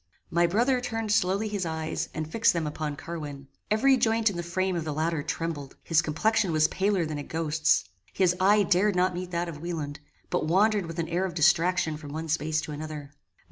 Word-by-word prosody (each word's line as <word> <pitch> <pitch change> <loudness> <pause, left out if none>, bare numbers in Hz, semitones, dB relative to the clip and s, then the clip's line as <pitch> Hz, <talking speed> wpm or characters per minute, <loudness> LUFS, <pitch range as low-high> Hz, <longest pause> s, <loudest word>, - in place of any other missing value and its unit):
My 170 +1 +3
brother 245 +8 +2
turned 225 -3 -3
slowly 200 +1 +2
his 205 -2 -2
eyes, 160 -1 -3
and 155 -1 -4
fixed 225 +8 +3
them 170 -2 -1
upon 150 0 -3
Carwin. 145 -4 -7 0.2
Every 260 +5 +4
joint 225 -2 +2
in - - -8
the 175 - -2
frame 185 +2 -1
of 170 - -2
the 155 -2 -4
latter 160 0 0
trembled. 155 -2 -4
His 165 -1 +3
complexion 185 +5 +1
was 155 -1 +4
paler 195 -3 +1
than 155 -1 -4
a - - -5
ghost's. 160 - +1 0.2
His 180 -2 +2
eye 205 +2 +5
dared 190 +2 +2
not 180 +1 +2
meet 180 0 -5
that 175 0 -2
of 150 -3 -7
Wieland, 155 -4 -4 0.3
but - - 0
wandered 200 +2 +3
with 165 +1 -7
an 165 -1 -1
air 175 +3 0
of 180 -3 -5
distraction 170 -1 +3
from 145 -2 -9
one 160 +1 -5
space 155 0 0
to - - -7
another. 150 -1 -6
170 Hz, 210 wpm, -27 LUFS, 155-190 Hz, 0.3 s, eye